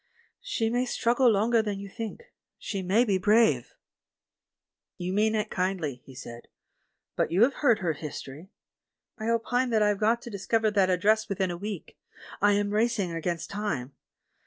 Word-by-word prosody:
"She 230 Hz, -, -1 dB
may 245 Hz, +1 st, +1 dB
struggle 245 Hz, +1 st, +2 dB
longer 225 Hz, +2 st, +3 dB
than 205 Hz, -2 st, -3 dB
you 200 Hz, -, -7 dB
think; 230 Hz, -, -8 dB, 0.2 s
she 195 Hz, -2 st, -4 dB
may 200 Hz, +7 st, +3 dB
be 195 Hz, -4 st, +1 dB
brave." 205 Hz, -, +3 dB, 1.2 s
"You 180 Hz, +1 st, -3 dB
mean 215 Hz, +2 st, +2 dB
it 215 Hz, -, -1 dB
kindly," 180 Hz, -9 st, -2 dB
he 135 Hz, -, -14 dB
said, 120 Hz, -2 st, -10 dB, 0.7 s
"but -, -, 0 dB
you 185 Hz, +6 st, +4 dB
have 270 Hz, +3 st, +3 dB
heard 245 Hz, -7 st, +3 dB
her 175 Hz, -6 st, -1 dB
history! 150 Hz, +2 st, -8 dB, 0.7 s
I 220 Hz, +1 st, -2 dB
opine 245 Hz, +2 st, +1 dB
that 220 Hz, -2 st, +3 dB
I've 210 Hz, -1 st, +1 dB
got 230 Hz, +2 st, +2 dB
to 235 Hz, -, -8 dB
dis 195 Hz, -2 st, -7 dB
cover 225 Hz, -2 st, +2 dB
that 195 Hz, -3 st, +3 dB
address 215 Hz, +5 st, +2 dB
within 190 Hz, -2 st, -1 dB
a -, -, -4 dB
week 200 Hz, 0 st, -7 dB, 0.2 s
— -, -, -15 dB
I 205 Hz, 0 st, +5 dB
am 205 Hz, 0 st, 0 dB
racing 215 Hz, -4 st, +1 dB
against 165 Hz, 0 st, -3 dB
time. 170 Hz, -11 st, -3 dB
205 Hz, 175 wpm, -27 LUFS, 180-225 Hz, 1.2 s, I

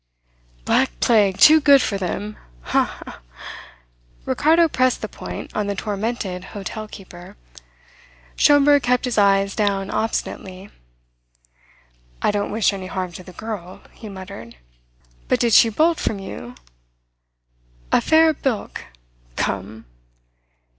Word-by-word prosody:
"Black -, -, +1 dB
plague 200 Hz, -4 st, +3 dB
too 310 Hz, +1 st, +7 dB
good 280 Hz, -1 st, +6 dB
for 215 Hz, -, -1 dB
them, 205 Hz, +3 st, -4 dB, 0.3 s
ha, -, -, -1 dB
ha!" -, -, -11 dB, 1.1 s
Ricardo 330 Hz, +2 st, +3 dB
pressed 255 Hz, -4 st, 0 dB
the -, -, -2 dB
point -, -, -9 dB
on 210 Hz, -1 st, -1 dB
the 200 Hz, -, -2 dB
tormented 200 Hz, -2 st, -4 dB
hotel 215 Hz, +2 st, -6 dB
keeper. 180 Hz, -4 st, -13 dB, 1.0 s
Schomberg 290 Hz, 0 st, +5 dB
kept 250 Hz, +1 st, +1 dB
his 240 Hz, -4 st, 0 dB
eyes 195 Hz, -1 st, +3 dB
down 200 Hz, -2 st, -1 dB
obstinately. 195 Hz, -3 st, -4 dB, 1.5 s
"I -, -, +1 dB
don't 205 Hz, 0 st, -2 dB
wish 215 Hz, -1 st, +1 dB
any 190 Hz, -1 st, -6 dB
harm 185 Hz, -1 st, -4 dB
to 175 Hz, -, -10 dB
the 180 Hz, -, -12 dB
girl 205 Hz, -5 st, -7 dB
" -, -, -29 dB
he 220 Hz, -, -11 dB
muttered. 190 Hz, -10 st, -10 dB, 0.7 s
"But -, -, +1 dB
did 235 Hz, -2 st, +1 dB
she 225 Hz, -, +7 dB
bolt 320 Hz, +9 st, +1 dB
from 210 Hz, -, -2 dB
you? 125 Hz, -10 st, -9 dB, 1.4 s
A -, -, +4 dB
fair 320 Hz, 0 st, +4 dB
bilk? 265 Hz, -6 st, -4 dB, 0.5 s
Come!" 100 Hz, +3 st, -4 dB
205 Hz, 125 wpm, -21 LUFS, 190-245 Hz, 1.5 s, too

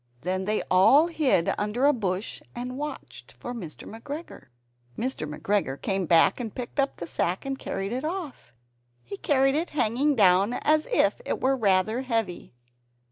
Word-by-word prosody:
Then 185 Hz, +4 st, -2 dB
they 215 Hz, +1 st, 0 dB
all 195 Hz, -, +6 dB
hid 305 Hz, -, +2 dB
under 210 Hz, +6 st, 0 dB
a 290 Hz, -, +5 dB
bush 195 Hz, -4 st, -3 dB
and 250 Hz, +1 st, -5 dB
watched 295 Hz, +2 st, -7 dB
for 245 Hz, -, -7 dB
Mr. 170 Hz, -, -8 dB
McGregor. 285 Hz, +9 st, -8 dB, 0.5 s
Mr. 235 Hz, -, -3 dB
McGregor 150 Hz, -4 st, -1 dB
came 195 Hz, -3 st, -1 dB
back 170 Hz, +6 st, +4 dB
and 225 Hz, -4 st, -5 dB
picked 250 Hz, +3 st, -6 dB
up 275 Hz, 0 st, +1 dB
the 170 Hz, -, -5 dB
sack, 175 Hz, +4 st, -2 dB
and 270 Hz, 0 st, -3 dB
carried 195 Hz, +3 st, -4 dB
it 255 Hz, -, -3 dB
off. 315 Hz, -, -5 dB, 0.5 s
He 160 Hz, +12 st, -7 dB
carried 270 Hz, +1 st, +2 dB
it 320 Hz, +4 st, -1 dB
hanging 280 Hz, +2 st, +1 dB
down, 195 Hz, +1 st, +4 dB
as 305 Hz, +4 st, +1 dB
if -, -, +2 dB
it -, -, -2 dB
were 270 Hz, +1 st, +2 dB
rather 215 Hz, +1 st, +2 dB
heavy. 225 Hz, -, -3 dB
230 Hz, 165 wpm, -26 LUFS, 190-275 Hz, 0.5 s, all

